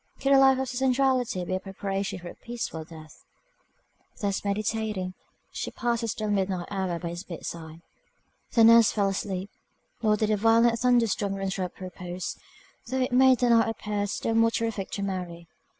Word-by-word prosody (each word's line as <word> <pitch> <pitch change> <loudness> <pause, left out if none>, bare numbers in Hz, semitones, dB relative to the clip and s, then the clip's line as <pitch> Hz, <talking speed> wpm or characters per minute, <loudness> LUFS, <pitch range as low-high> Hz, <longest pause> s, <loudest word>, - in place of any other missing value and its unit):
Could 275 - +1
a 275 - +7
life 270 -1 +6
of 265 0 -2
sensuality 255 -5 +1
be 185 - -3
a 185 - 0
preparation 195 0 -4
for 175 -1 -8
a - - -9
peaceful 235 -9 -5
death? 155 -1 -14 1.0
Thus 200 -2 -1
meditating, 210 -2 -2 0.4
she - - -4
passed 235 -1 -1
the 230 - -2
still 215 -1 -2
midnight 190 -3 -1
hour 190 -3 -1
by 170 0 -5
his 175 +2 -6
bedside. 165 -2 -8 0.7
The 230 - +5
nurse 230 -1 +7
fell 200 -2 +1
asleep, 195 0 -3 0.5
nor 215 -2 +3
did 215 0 +1
a 210 - +2
violent 230 +2 +4
thunder 245 -2 +4
storm 200 -2 -2
interrupt 190 -2 -3
her 185 - -7
repose, 180 0 -6 0.5
though 260 +2 -1
it 255 - 0
made 255 0 +5
the 245 -1 +4
night 230 -1 +4
appear 210 -2 -2
still 225 +2 -2
more 225 0 +4
terrific 225 -4 -2
to 200 - -2
Mary. 180 -3 -5
205 Hz, 180 wpm, -27 LUFS, 185-230 Hz, 1.0 s, a